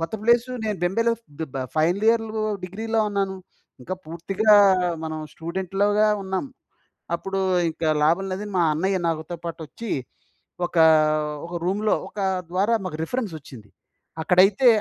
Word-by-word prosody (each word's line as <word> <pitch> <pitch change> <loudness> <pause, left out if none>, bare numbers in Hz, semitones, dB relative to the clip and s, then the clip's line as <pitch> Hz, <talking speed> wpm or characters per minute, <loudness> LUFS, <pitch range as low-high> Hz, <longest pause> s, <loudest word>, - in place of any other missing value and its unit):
కొత్త 165 +3 -3
ప్లేసు 235 +2 +3
నేను 210 -2 -1
బెంబేలో 230 +6 +2
ఫ్ - - -41 0.2
బ 160 - -3
బ 130 - -2
ఫైనల్ 175 +7 +2
ఇయర్‌లో 225 -1 +1 0.2
డిగ్రీలో 220 +4 -2
ఉన్నాను. 195 -1 -1 0.5
ఇంకా 185 - -4
పూర్తిగా 195 +6 +1 0.5
మనం 155 0 -4
స్టూడెంట్‌లోగా 195 +5 0
ఉన్నాం. 190 +3 -2 0.7
అప్పుడు 195 +2 -4 0.3
ఇంక 160 +1 -8 0.2
లాభం 170 +5 +3
లేదని 205 +2 -4
మా - - +4
అన్నయ్య 190 +5 0
నాగొతోపాటొచ్చి 165 +5 -5 0.8
ఒక, 175 - -7 0.7
ఒక 175 - -7
రూమ్‌లో 210 +3 +1
ఒక - - -9 0.3
ద్వారా 200 +5 +1
మాకు 155 -4 -4
రిఫరెన్స్ 220 +1 -3
ఒచ్చింది. 125 -7 -13 0.5
అక్కడైతే 195 +8 +4
190 Hz, 130 wpm, -24 LUFS, 170-215 Hz, 0.8 s, మా